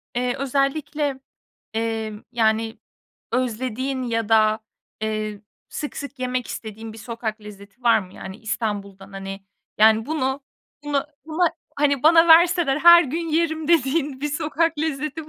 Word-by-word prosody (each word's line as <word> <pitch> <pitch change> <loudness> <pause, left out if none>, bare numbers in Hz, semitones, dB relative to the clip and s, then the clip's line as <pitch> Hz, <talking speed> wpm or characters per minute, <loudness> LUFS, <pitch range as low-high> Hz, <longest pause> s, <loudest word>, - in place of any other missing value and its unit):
eee, 245 0 0
özellikle, 275 +1 -1 0.6
eee, 225 -1 -2 0.2
yani, 225 -1 +1 0.5
özlediğin 255 +2 -2
ya 230 -2 -2
da, 215 -1 +4 0.4
eee, 215 -1 -3 0.3
sık 295 - -6
sık 280 -1 -7
yemek 255 -1 -2
istediğin 220 0 -7
bir 225 - -11
sokak 225 -1 -5
lezzeti 205 +2 -13
var 235 -2 +5
mı? 185 -3 -9
Yani, 190 +1 -8
İstanbul'dan, 200 -3 -4
hani, 195 0 -6 0.4
yani, 220 +1 +5
bunu 280 -3 -1 0.4
bunu 290 -1 -1 0.2
buna, 325 +1 +1 0.2
hani, 280 -2 +2
bana 330 +2 +6
verseler 335 -3 +6
her 345 +2 +9
gün 325 +5 -3
yerim 315 -1 0
dediğin 285 -3 +1
bir 295 - -1
sokak 315 +2 0
lezzeti 305 0 -3
255 Hz, 135 wpm, -23 LUFS, 220-300 Hz, 0.6 s, her